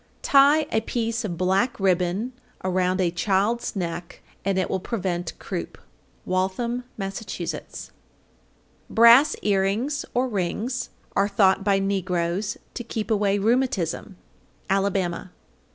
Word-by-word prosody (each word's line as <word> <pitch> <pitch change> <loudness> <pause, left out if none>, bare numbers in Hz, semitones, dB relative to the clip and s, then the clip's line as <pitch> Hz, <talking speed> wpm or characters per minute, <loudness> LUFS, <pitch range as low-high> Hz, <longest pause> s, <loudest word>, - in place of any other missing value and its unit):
Tie 285 +3 +5
a 220 - +2
piece 230 0 -2
of 175 -6 -3
black 195 +7 +1
ribbon 190 +5 +1 0.3
around 185 0 +1
a 175 -2 +2
child's 200 +7 0
neck, 175 -2 -5 0.2
and 195 0 0
it 185 - +1
will 190 - -1
prevent 180 -5 -3
croup. - - -5 0.5
Waltham, 215 +7 -1
Mass. 195 -1 -4
807. 185 -5 -6 1.0
Brass 235 +6 +7
earrings 210 +8 +1
or 250 +2 +2
rings 220 +4 -2 0.3
are 200 - +3
thought 195 -1 +3
by 200 -1 +3
negroes 190 0 -1 0.2
to 240 - -5
keep 225 -1 -4
away 205 -2 +2
rheumatism. 205 -5 0 0.5
_Alabama. 195 -3 0
195 Hz, 120 wpm, -24 LUFS, 185-230 Hz, 1.0 s, Brass